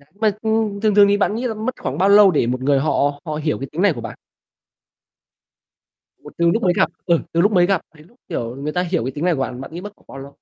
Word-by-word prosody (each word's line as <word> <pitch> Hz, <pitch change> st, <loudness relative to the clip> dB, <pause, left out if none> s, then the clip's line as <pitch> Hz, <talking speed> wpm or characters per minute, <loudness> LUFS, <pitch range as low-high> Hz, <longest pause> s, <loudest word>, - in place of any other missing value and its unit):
Mà 215 Hz, 0 st, +1 dB
thường 220 Hz, -2 st, 0 dB, 0.2 s
thường 205 Hz, -1 st, +7 dB
thì 205 Hz, 0 st, +2 dB
bạn 205 Hz, +1 st, 0 dB
nghĩ 245 Hz, +3 st, -2 dB
là 225 Hz, -, -3 dB
mất 220 Hz, +4 st, -4 dB
khoảng 130 Hz, +2 st, -3 dB
bao 190 Hz, +3 st, +3 dB
lâu 200 Hz, -2 st, +7 dB
để 145 Hz, -6 st, +1 dB
một 125 Hz, +1 st, -2 dB
người 140 Hz, 0 st, +2 dB
họ 145 Hz, 0 st, 0 dB
họ 155 Hz, -2 st, -4 dB
hiểu 150 Hz, -2 st, -2 dB
cái 135 Hz, -, -5 dB
tính 165 Hz, +4 st, -3 dB
này 200 Hz, -5 st, +4 dB
của -, -, -8 dB
bạn? -, -, -8 dB, 2.1 s
Một -, -, -12 dB
từ 170 Hz, 0 st, +3 dB
lúc 225 Hz, -, -1 dB
mới 180 Hz, -2 st, +3 dB
gặp -, -, +2 dB, 0.2 s
ừ, 170 Hz, -2 st, +3 dB
từ 170 Hz, -, +2 dB
lúc 205 Hz, +4 st, +3 dB
mới 180 Hz, -3 st, +4 dB
gặp 190 Hz, -2 st, +1 dB
đến 150 Hz, +1 st, -17 dB
lúc, 240 Hz, +5 st, -27 dB
kiểu, 120 Hz, -7 st, -4 dB
người 145 Hz, +2 st, -4 dB
ta 180 Hz, -, -1 dB
hiểu 175 Hz, -6 st, -1 dB
cái 130 Hz, -, -3 dB
tính 145 Hz, +5 st, -6 dB
này 180 Hz, -, +3 dB
của 135 Hz, -, -5 dB
bạn, 130 Hz, -1 st, -4 dB
bạn 145 Hz, -, -9 dB
nghĩ 175 Hz, -, -6 dB
mất 205 Hz, +1 st, -9 dB
khoảng -, -, -29 dB
bao 135 Hz, -, -11 dB
lâu? 140 Hz, +1 st, -11 dB
170 Hz, 280 wpm, -20 LUFS, 145-205 Hz, 2.1 s, thường